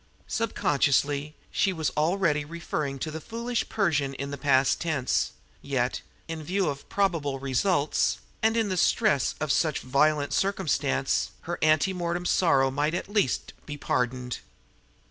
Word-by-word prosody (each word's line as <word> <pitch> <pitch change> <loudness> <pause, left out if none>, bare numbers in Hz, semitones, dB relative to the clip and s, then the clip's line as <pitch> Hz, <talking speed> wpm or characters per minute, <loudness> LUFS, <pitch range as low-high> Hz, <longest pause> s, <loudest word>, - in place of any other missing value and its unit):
Sub 230 0 -2
consciously, 145 +1 +1 0.2
she 195 - +2
was 160 -4 -1
already 155 -1 +1
referring 150 -3 -4
to 155 +4 -4
the 160 +1 -6
foolish 235 +3 -3
Persian 145 -10 0
in 140 +1 -5
the - - -3
past 135 -1 +2
tense; 155 -7 0 0.3
yet, 125 -3 -1 0.3
in 165 -1 -5
view 185 +2 0
of 140 -1 -7
probable 165 -9 0
results, 140 +4 +1 0.2
and 225 +1 +3
in 220 -3 +1
the 185 - -1
stress 195 - +2
of 155 -1 0
such 155 0 +1
violent 145 +3 +2
circumstance, 155 -8 +1
her 170 +1 -4
anti 155 +4 +3
mortem 175 0 -2
sorrow 135 -8 +3
might 150 +4 0
at 185 - -4
least 205 - 0
be 145 -1 -5
pardoned. 125 -2 -1
155 Hz, 145 wpm, -27 LUFS, 140-180 Hz, 0.3 s, and